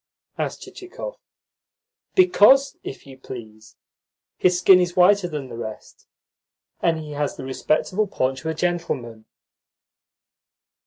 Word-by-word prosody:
asked - - -4
Chichikov. 390 +6 -9 1.0
"Because, 275 - +5
if 135 - -8
you 135 -1 -13
please, 110 -4 -11 0.6
his 180 -1 +2
skin 180 +1 +6
is 180 0 -1
whiter 185 +1 +5
than 150 -5 -5
the 120 - -9
rest, 110 -2 -9 0.7
and 165 -1 +2
he 155 -1 -8
has 145 -1 -2
the - - -7
respectable 155 +9 0
paunch 130 -6 -1
of 160 - -7
a 160 - -2
gentleman." 140 -11 -3
160 Hz, 120 wpm, -23 LUFS, 130-185 Hz, 1.0 s, skin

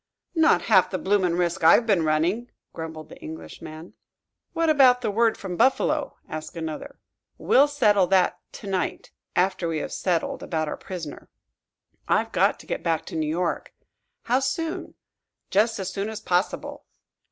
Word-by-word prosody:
"Not 325 -1 +4
half 190 -5 +4
the 185 - -2
bloomin' 190 -3 +1
risk 175 0 -1
I've 170 +8 +6
been 195 -7 +2
running," 170 +10 0 0.2
grumbled 160 -1 -7
the - - -13
Englishman. 160 +1 -9 0.6
"What 330 -1 0
about 265 -5 +5
the 220 -4 -1
word 225 +2 +2
from 190 -3 -5
Buffalo?" 260 +3 +1
asked 155 +2 -7
another. 165 - -6 0.4
"We'll 280 +3 +4
settle 210 -10 +3
that 180 -1 +2
to - - -10
night 190 -2 -2 0.2
after 180 -1 +1
we 165 -1 -1
have - - -4
settled 175 -3 -1
about 160 -2 -2
our - - -3
prisoner." 170 -6 -8 0.8
"I've - - +1
got - - +2
to - - -16
get - - -3
back 165 -1 -1
to - - -8
New 155 -1 -1
York." 170 +2 -2 0.5
"How 250 +2 +2
soon?" 320 +5 -3 0.6
"Just 220 +3 +2
as 190 -1 -4
soon 200 +1 -2
as 220 - -6
possible." 180 +1 -2
185 Hz, 160 wpm, -25 LUFS, 165-230 Hz, 0.8 s, I've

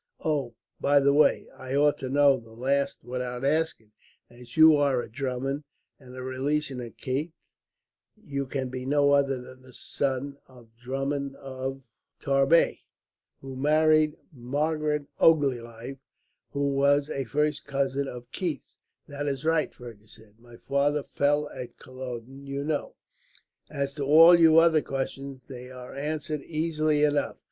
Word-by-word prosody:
Oh, 140 -7 -1 0.2
by 145 0 +4
the 140 0 +3
way, 150 +2 +3
I 130 +1 -5
ought 145 +1 +3
to 130 - -4
know 140 -1 +4
the 115 -1 -16
last 140 +3 -1
without 125 +1 -4
asking; 145 -7 0 0.4
as 120 +3 -14
you 160 0 +8
are 140 -3 +2
a - - -4
Drummond, 135 +3 -3 0.4
and 130 -2 -13
a 130 - -7
relation 135 +1 -2
of 120 -1 -9
Keith, 145 +6 -3 0.8
you 140 -9 -4
can 130 -1 -3
be 130 0 -5
no 145 0 +3
other 140 -2 +2
than 130 +1 -12
the 130 -1 -17
son 140 +2 -3
of 120 -3 -18
the 115 - -39
Drummond 135 +2 -3
of 135 0 -6 0.4
Tarbet, 135 +4 +3 0.6
who 135 -1 -8
married 155 +2 +3 0.2
Margaret 150 +3 -1
Ogilvie, 130 -4 +1 0.5
who 140 0 -1
was 140 +1 +3
a 135 -1 -2
first 150 +3 -1
cousin 140 0 -1
of 120 -2 -9
Keith's." 170 -7 -4 0.3
"That 145 0 -5
is 140 0 -3
right," 160 -1 +2
Fergus 115 -2 -11
said. 110 -1 -18
"My 120 0 -15
father 140 +3 0
fell 145 +1 +1
at 125 -2 -9
Culloden, 130 +1 -9
you 140 +1 -3
know. 315 - -3 0.7
As 140 -1 -3
to 145 - -4
all 160 +5 +8
your 165 -1 +7
other 160 -2 +4
questions, 135 -1 -5
they 125 -2 -9
are 125 -1 -10
answered 150 +1 -3
easily 155 -1 0
enough. 145 -1 +1
140 Hz, 150 wpm, -27 LUFS, 130-150 Hz, 0.8 s, you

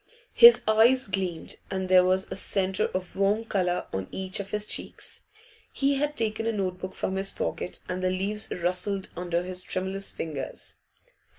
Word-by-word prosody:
His 475 0 +9
eyes 230 +4 +4
gleamed, 185 -4 -3
and 190 -1 -2
there 185 0 +6
was 185 +1 +1
a - - -2
centre 190 -1 0
of 185 -1 -5
warm 205 +3 +1
colour 180 -4 0
on 95 -1 -3
each 190 0 -3
of 200 -1 -5
his 210 0 0
cheeks. - - -5 0.5
He 275 0 +1
had 295 +1 -1
taken 225 0 -1
a - - +2
note 185 -4 -2
book 185 0 -6
from 190 - -2
his 195 0 +1
pocket, 180 - -4
and 180 0 -3
the 185 - +1
leaves 200 +3 +1
rustled 180 +3 -1
under 175 0 -1
his 185 0 -3
tremulous 190 +2 -1
fingers. 150 -4 -5
190 Hz, 175 wpm, -27 LUFS, 185-210 Hz, 0.5 s, His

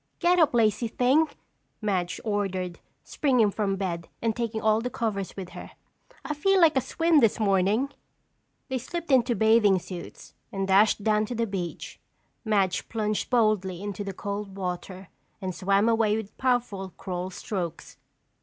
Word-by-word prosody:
"Get 355 +1 +3
up, 310 -7 +4
lazy 225 0 +2
thing!" 260 +7 +3 0.5
Madge 185 -5 -1
ordered, 190 -4 -2 0.2
springing 250 -8 +2
from 200 -1 -1
bed 175 -3 -4
and 225 -1 0
taking 230 -2 -2
all 220 0 +2
the 250 - -2
covers 210 -6 -3
with 185 -2 -6
her. - - -10 0.5
"I 300 - -2
feel 385 +6 +2
like 325 -4 +5
a 265 - +3
swim 330 +3 +2
this 225 -5 +3
morning." 205 +5 +2 0.8
They 260 -1 -2
slipped 335 +5 -5
into 245 -2 +4
bathing 220 -3 +4
suits 180 -1 -9 0.2
and 195 -1 -2
dashed 205 +2 +4
down 215 0 +2
to 245 - -4
the 230 0 0
beach. 190 -5 -5 0.4
Madge 200 -5 0
plunged 215 -2 -1
boldly 215 -7 +2
into 205 -1 -4
the 200 - -4
cold 200 +1 -5
water 185 0 -5 0.3
and 190 -2 -4
swam 195 +4 +2
away 225 -2 +3
with 220 -2 -7
powerful 235 -8 -1
crawl 180 0 -4
strokes. 180 -3 -5
210 Hz, 155 wpm, -26 LUFS, 190-235 Hz, 0.8 s, like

